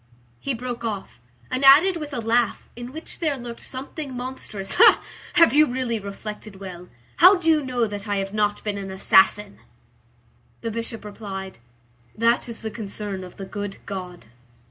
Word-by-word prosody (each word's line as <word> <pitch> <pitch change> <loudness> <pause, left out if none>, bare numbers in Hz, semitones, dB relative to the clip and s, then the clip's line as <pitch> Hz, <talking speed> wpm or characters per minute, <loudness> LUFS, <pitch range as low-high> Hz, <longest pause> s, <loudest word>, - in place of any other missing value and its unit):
He 270 - -2
broke 240 0 -5
off, 205 - -5 0.3
and 255 +1 -1
added 305 +8 +8
with 300 -3 -5
a 255 - -3
laugh 230 +1 0
in 240 +1 -7
which 315 +4 -8
there 305 -5 0
lurked 240 -2 -8
something 270 0 -6
monstrous:— 245 -6 -5 0.6
"Have 335 -8 +6
you 305 +1 +6
really 245 -2 -1
reflected 210 +1 -7
well? 180 -2 -9 0.3
How 370 +4 +8
do 350 -3 -4
you 310 -2 +4
know 250 -3 0
that 205 0 -6
I 205 - 0
have 195 0 -3
not 210 -1 0
been 205 -1 -2
an 195 -1 -6
assassin?" 195 +2 +3 1.0
The 230 - -3
Bishop 230 -1 -4
replied:— 195 - -7 0.6
"That 235 +2 +2
is 230 - -7
the 220 - -3
concern 205 -3 -5
of 180 - -11
the 195 - -6
good 205 0 -5
God." 180 -5 -7
225 Hz, 165 wpm, -24 LUFS, 200-255 Hz, 1.0 s, added